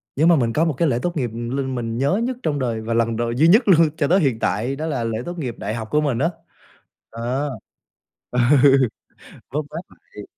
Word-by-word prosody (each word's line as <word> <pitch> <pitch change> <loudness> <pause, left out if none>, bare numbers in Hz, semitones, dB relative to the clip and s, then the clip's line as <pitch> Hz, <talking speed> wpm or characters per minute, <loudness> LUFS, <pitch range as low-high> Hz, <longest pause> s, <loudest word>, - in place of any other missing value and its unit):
nhưng 155 +4 +3
mà 170 - +6
mình 120 -6 0
có 160 +6 +2
một 160 - 0
cái 165 - +2
lễ 120 -4 0
tốt 175 -1 -2
nghiệp, 125 -4 -1
ừm, 120 +1 -5
l - - 0
mình 120 -3 -3
nhớ 140 - +1
nhất 250 0 -2
trong 145 -2 -1
đời 115 -4 -2
và 115 +1 -3
lần 115 0 +1
đ 115 - -2 0.2
duy 155 +4 +5
nhất 215 +9 +6
luôn 165 -4 +5
cho 145 - +1
tới 185 +5 +4
hiện 135 -9 0
tại 115 +9 -1
đó 155 +3 -4
là 140 -7 -2
lễ 115 -1 -2
tốt 175 +1 -6
nghiệp 125 -7 -4
đại 105 - -4
học 110 -2 -5
của 150 - +3
mình 140 -6 -1
á, 160 +5 +2 0.8
ờ. 125 +5 -3 0.9
Ừ. 135 0 +5 0.6
Vớt 150 +3 -2
vát 165 - -5
lại. 105 - -14
135 Hz, 235 wpm, -21 LUFS, 115-155 Hz, 0.9 s, mà